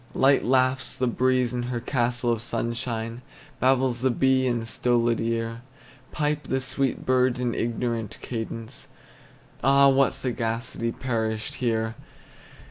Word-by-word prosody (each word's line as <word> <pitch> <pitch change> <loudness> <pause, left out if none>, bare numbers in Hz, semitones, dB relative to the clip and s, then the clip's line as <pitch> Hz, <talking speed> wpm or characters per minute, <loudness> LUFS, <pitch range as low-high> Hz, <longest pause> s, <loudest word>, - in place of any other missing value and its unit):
Light 135 +1 +4
laughs 130 +1 +2
the 130 - 0
breeze 125 0 +1
in 125 - -1
her 120 -1 -2
castle 120 -1 0
of 115 -2 -1
sunshine; 115 0 -3 0.4
Babbles 130 -2 +2
the 130 - +3
bee 130 +1 +2
in 120 -2 0
a - - -7
stolid 120 0 +1
ear; 115 0 -2 0.5
Pipe 150 0 -1
the 130 - 0
sweet 135 0 -1
birds 130 -1 +2
in 120 -2 0
ignorant 115 -2 -2
cadence, 115 -1 -6 0.8
Ah, 140 0 +6
what 135 0 +3
sagacity 115 -1 -2
perished 110 -3 -2
here! 115 -2 0
120 Hz, 130 wpm, -25 LUFS, 115-130 Hz, 0.8 s, Ah